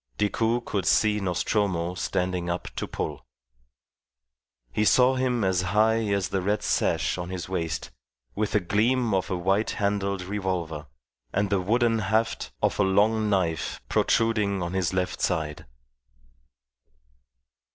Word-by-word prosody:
Decoud 115 +3 0
could 100 -4 -2
see 105 -1 +3
Nostromo 90 -1 0
standing 90 -1 -2
up 85 +1 -3
to - - -3
pull. - - -4 1.5
He 105 - 0
saw 125 +4 +5
him 125 -3 0
as 95 -2 +2
high 110 +4 +2
as 100 -2 0
the 95 - -1
red 105 +3 0
sash 90 - 0
on 90 0 -5
his 90 -2 -5
waist, 85 -4 -3 0.4
with 105 0 -2
a - - +5
gleam 110 +5 +1
of 95 -1 0
a 95 - -1
white 95 +5 +1
handled 100 -2 -1
revolver 90 -6 -3 0.4
and 100 +1 0
the 100 -2 +2
wooden 115 +3 +2
haft 110 +3 0
of - - +1
a - - +5
long 105 +3 +2
knife 90 -6 0
protruding 105 -4 +1
on 85 +1 -4
his 95 -3 0
left 90 -1 -2
side. 75 -1 -2
100 Hz, 140 wpm, -26 LUFS, 90-110 Hz, 1.5 s, saw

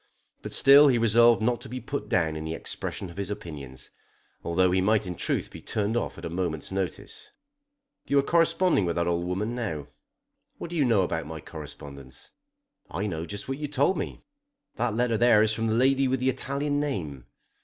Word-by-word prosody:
But - - -7
still 140 +2 +7
he 130 -3 +4
resolved 115 0 +5
not 120 +1 +1
to - - -10
be 130 +2 -5
put 125 -6 -5
down 85 -8 +1
in 80 - -5
the 80 +1 -4
expression 90 +2 -5
of 85 - -15
his 100 -1 -3
opinions, 70 -10 -8 0.5
although 90 +2 +2
he 95 +1 +2
might 105 +2 +2
in 90 - -4
truth - - -2
be - - -10
turned 105 +1 -1
off 120 - -2
at - - -8
a - - -2
moment's 85 -3 -3
notice. 95 -3 -4 0.8
"You 140 - +2
are 140 - +5
corresponding 170 - +3
with 85 - -1
that 85 - 0
old 85 0 -1
woman 105 +6 -2
now?" 80 - -4 0.7
"What 170 - -7
do - - -4
you 150 -4 +3
know 110 -6 +3
about 85 -2 -3
my 80 0 -6
correspondence?" 70 -4 -10 0.6
"I 95 +5 -3
know 85 -4 -4
just 100 +4 -6
what 135 +1 -4
you 150 - -3
told 145 +6 +2
me. - - -5 0.5
That 120 -2 -1
letter 115 -2 +1
there 115 -3 +6
is 110 0 +1
from 115 +1 -1
the 110 - +1
lady 135 +2 +3
with 130 0 0
the 130 +1 +1
Italian 140 +3 -2
name. 80 - -4
105 Hz, 205 wpm, -27 LUFS, 85-125 Hz, 0.8 s, still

